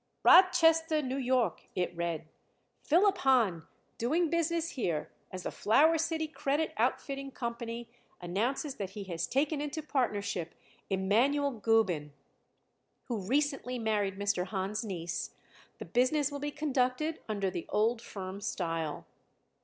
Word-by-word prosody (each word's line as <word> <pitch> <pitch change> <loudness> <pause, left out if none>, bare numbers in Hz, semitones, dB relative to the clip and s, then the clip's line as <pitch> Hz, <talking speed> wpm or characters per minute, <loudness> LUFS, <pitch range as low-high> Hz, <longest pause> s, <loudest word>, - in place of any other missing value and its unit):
"Rochester, 325 -3 +6
N. 270 -3 -1
Y.," 255 -3 +3 0.2
it 180 -1 -1
read. 170 -2 -3 0.5
"Philip 390 +5 +3
Hahn, 225 -11 +2 0.3
doing 315 +8 +1
business 335 0 0
here 175 - -2 0.2
as 185 -1 -7
the - - -3
Flower 310 +9 +4
City 320 0 -1
Credit 300 0 -1
Outfitting 275 -1 -1
Company, 235 -2 -5 0.3
announces 235 - -2
that 195 -2 -3
he 205 - -4
has 170 -3 -3
taken 285 +2 0
into 295 +1 -4
partnership 205 - -1 0.3
Emanuel 235 +10 +2
Gubin, 205 - +1 1.0
who 235 -3 -1
recently 265 +3 0
married 210 -4 0
Mr. 200 -2 0
Hahn's 195 +3 -2
niece. 170 -5 -4 0.4
The - - -7
business 280 +4 +2
will 285 - -4
be 290 +1 -2
conducted 290 +1 0
under 200 -3 -1
the 175 -2 -5
old 225 +2 +1
firm 195 -3 -7
style." 165 -5 -3
240 Hz, 130 wpm, -31 LUFS, 195-290 Hz, 1.0 s, Rochester